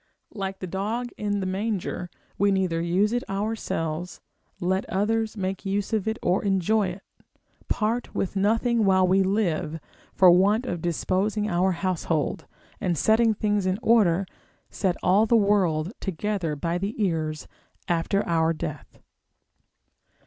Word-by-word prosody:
Like 195 -2 -4
the 185 - -6
dog 210 +7 -3
in 205 -1 -2
the - - -2
manger, 190 -2 -2 0.3
we 200 +1 +2
neither 185 -4 0
use 185 +6 +1
it 245 - 0
ourselves, 180 -5 -3 0.4
let 190 +2 -1
others 220 +3 0
make 190 0 -3
use 200 +2 -2
of 220 -1 +1
or 180 +2 +1
enjoy 200 +1 +2
it; 185 +2 -7 0.6
part 230 +3 -1
with 195 - -2
nothing 225 +4 +2
while 190 -2 +4
we 190 +2 +4
live: 180 -5 0 0.4
for 185 -2 +7
want 200 +7 +3
of 175 -9 -3
disposing 195 +5 -1
our 180 +2 +2
household, 170 -4 -2 0.3
and 180 -5 -1
setting 220 +7 +3
things 205 -2 0
in 185 +1 +1
order, 195 -5 +4 0.5
set 185 -3 0
all 200 +5 +4
the 235 - +5
world 190 -5 +2
together 190 -3 -2
by 170 +4 -2
the 200 +4 -3
ears 155 -3 -2 0.4
after 175 +4 0
our 165 -1 +2
death. 155 - -7
195 Hz, 140 wpm, -25 LUFS, 175-210 Hz, 0.6 s, for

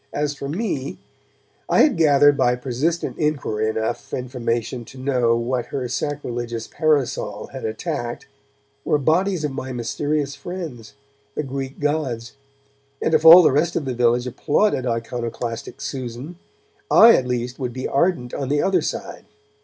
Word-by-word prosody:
As 145 0 -1
for 140 -1 -6
me, 160 - -3 0.7
I - - +5
had 300 - +4
gathered 145 -3 +5
by 125 -3 +2
persistent 135 +7 -2
inquiry 135 -8 0
enough 110 +1 -3
information 120 -1 -3
to 130 - -13
know 130 -3 +1
that 120 - -2
what 125 0 -1
her 130 -3 -3
sacrilegious 120 -4 -3
parasol 135 -9 -1
had 130 - -6
attacked 120 +2 -4 0.6
were - - +2
bodies 170 +4 +1
of 150 - -1
my 130 0 -5
mysterious 140 +4 -2
friends, 160 - -7 0.4
the 150 - -1
Greek 135 0 -5
gods, 145 -6 -2 0.7
and 160 - 0
if 155 0 +3
all 170 +3 +11
the 155 - +5
rest 155 +5 +1
of 150 - -1
the 130 - -2
village 120 0 +2
applauded 145 - +1
iconoclastic 115 0 -4
Susan, 130 +6 -6 0.5
I 230 +1 +8
at 125 - 0
least 125 +1 -3
would 125 -2 -2
be 130 +1 -4
ardent 140 -5 0
on 135 -2 -3
the 145 +1 +2
other 195 - +2
side. - - -5
130 Hz, 155 wpm, -22 LUFS, 120-150 Hz, 0.7 s, all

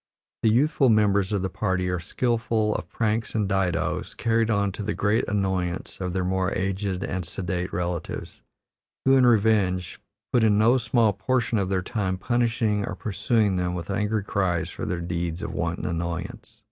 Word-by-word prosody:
The - - +4
youthful 135 +3 +3
members 100 -3 +3
of 100 -3 0
the 95 - -1
party 95 -3 -1
are 90 -1 -1
skillful 115 +2 0
of - - -5
pranks 110 0 -1
and 105 -3 +1
didoes, 90 -4 -1
carried 115 -1 +1
on 100 -2 +1
to 100 - -7
the 105 +1 -2
great 105 +3 +1
annoyance 95 -3 -2
of 90 -1 -2
their 95 0 0
more 95 +1 0
aged 95 0 -2
and 90 0 -3
sedate 90 +1 -3
relatives, 85 -1 -4 0.6
who, 135 0 +6
in 130 -2 +5
revenge, 100 -6 +2 0.3
put 120 -3 +4
in 105 -2 +4
no 115 +5 +4
small 115 -2 +2
portion 115 +3 0
of 95 -2 -1
their 95 -2 0
time 95 -4 -2
punishing 115 -1 +1
or - - -4
pursuing 105 -1 +1
them 90 0 -1
with 85 +2 -5
angry 105 +1 0
cries 90 -4 -1
for - - -5
their 90 -1 -2
deeds 85 0 -3
of 80 - -4
wanton 85 +1 -2
annoyance. 85 -1 -4
100 Hz, 175 wpm, -25 LUFS, 90-110 Hz, 0.6 s, who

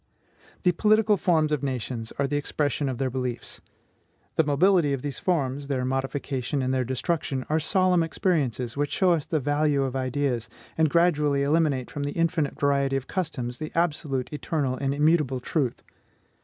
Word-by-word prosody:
The 180 - +5
political 215 +4 +3
forms 160 -5 +2
of 150 -3 0
nations 125 -4 -3
are 140 - +1
the 140 +2 -2
expression 145 -1 -1
of 130 - -3
their 130 0 -1
beliefs. 125 -2 -4 0.7
The 160 - +4
mobility 155 +1 +3
of 135 - -3
these 145 -2 -4
forms, 145 -5 -1
their 130 -3 -1
modification 135 0 -2
and 130 +1 0
their 130 -1 +1
destruction, 130 +1 -2
are 155 +1 +2
solemn 180 +2 +2
experiences 140 - -1
which 145 +1 -1
show 185 -2 +3
us 160 -4 0
the 160 - 0
value 145 0 +1
of 135 -1 -3
ideas, 130 -2 -1 0.3
and 160 -1 +3
gradually 150 -4 +2
eliminate 145 -4 +1
from 145 - -5
the 145 0 -2
infinite 165 -4 0
variety 140 -2 +2
of 135 -1 -2
customs 130 -10 -3
the 155 - -5
absolute, 150 -6 -1
eternal, 145 -3 -1
and 135 +1 -1
immutable 150 -3 +2
truth. 130 0 -2
145 Hz, 170 wpm, -26 LUFS, 130-160 Hz, 0.7 s, The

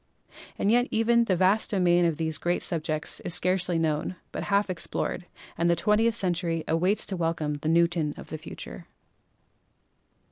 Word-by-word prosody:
And 205 - +1
even 235 -1 +3
yet 235 - +2
the 185 - +2
vast 190 +4 +2
domain 175 -3 +3
of 165 -3 0
these 160 -2 -1
great 175 +1 -1
subjects 155 -2 -2
is 175 - -1
scarcely 180 -1 +1
known, 160 +2 -1 0.2
but - - -4
half 200 0 +2
explored, 180 0 -3 0.3
and 170 +1 +2
the 170 - +4
twentieth 210 +6 +2
century 170 -3 -1
waits 180 +6 +1
to 195 - -3
welcome 165 -4 -2
the 155 - -1
Newton 170 -2 +2
of - - -10
the 155 - -6
future. - - -9
175 Hz, 165 wpm, -27 LUFS, 165-195 Hz, 0.3 s, the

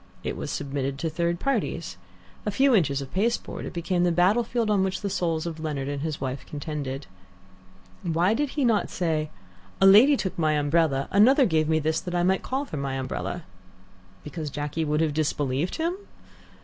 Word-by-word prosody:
It - - -3
was - - -5
submitted 135 -1 -3
to 160 +2 -2
third 170 +1 -1
parties. 195 - -2 0.5
A - - -1
few 265 +6 +3
inches 140 - +2
of 135 - -12
pasteboard, 230 +5 -1
it - - -7
became 175 +1 0
the 175 - +3
battlefield 215 +6 +2
on 200 -2 +3
which 190 -1 -2
the 200 -2 -2
souls 165 -4 -1
of 165 -2 -5
Leonard 150 -4 -3
and 140 -1 -3
his 155 -1 -3
wife 130 0 -4
contended. 145 -2 -5 1.0
Why 175 +4 +2
did 290 +4 0
he 280 - +2
not 225 -3 +2
say, 155 -4 -1 0.5
"A 195 - +5
lady 230 +9 +8
took 190 -6 -3
my 155 -1 +2
umbrella, 145 -2 +1
another 255 +7 +6
gave 160 -5 +1
me 160 - +3
this 160 +1 0
that 175 -1 -5
I 175 - +2
might 190 +1 +2
call 270 +2 -2
for 160 - -6
my 140 -1 -2
umbrella"? 135 +6 -4 0.8
Because 150 0 -5
Jacky 150 +3 -3
would 150 0 0
have 155 -2 +1
disbelieved 145 0 -1
him? 335 +2 0
165 Hz, 190 wpm, -26 LUFS, 150-195 Hz, 1.0 s, lady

